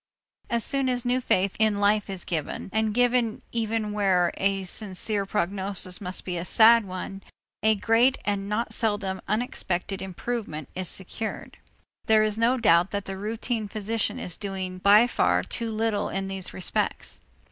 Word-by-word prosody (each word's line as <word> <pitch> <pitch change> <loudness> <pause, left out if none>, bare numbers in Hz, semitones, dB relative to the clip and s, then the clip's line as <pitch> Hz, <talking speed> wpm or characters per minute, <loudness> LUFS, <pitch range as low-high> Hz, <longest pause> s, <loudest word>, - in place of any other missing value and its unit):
As 235 -2 0
soon 275 -2 0
as 250 -1 -2
new 250 +1 +1
faith 195 -5 +1
in 215 -2 +3
life 205 +1 +2
is 190 -2 -5
given, 165 +2 -3
and 220 0 +1
given 245 -1 +1
even 225 -2 -1
where 185 -4 +2
a 195 0 +1
sincere 200 +1 -3
prognosis 190 -1 0
must 185 -1 -3
be 180 -2 -3
a - - -3
sad 225 +4 +6
one, 190 +1 -6 0.4
a 220 +1 +4
great 230 +5 +3
and 200 -1 -1
not 220 +3 -1
seldom 205 -4 -1
unexpected 200 -5 -2
improvement 190 - -5
is 185 -1 -2
secured. 215 +4 -3 0.5
There 220 -1 +5
is 215 0 -1
no 240 +3 +3
doubt 175 -6 +4
that 200 -1 -3
the 195 - -5
routine 220 +2 -3
physician 215 +2 -1
is 180 - -6
doing 190 -2 -5
by 205 +4 +6
far 245 - +1
too 230 -1 -3
little 220 -1 -1
in 195 0 -3
these 190 -1 -3
respects. 185 - -2
205 Hz, 160 wpm, -26 LUFS, 190-225 Hz, 0.5 s, sad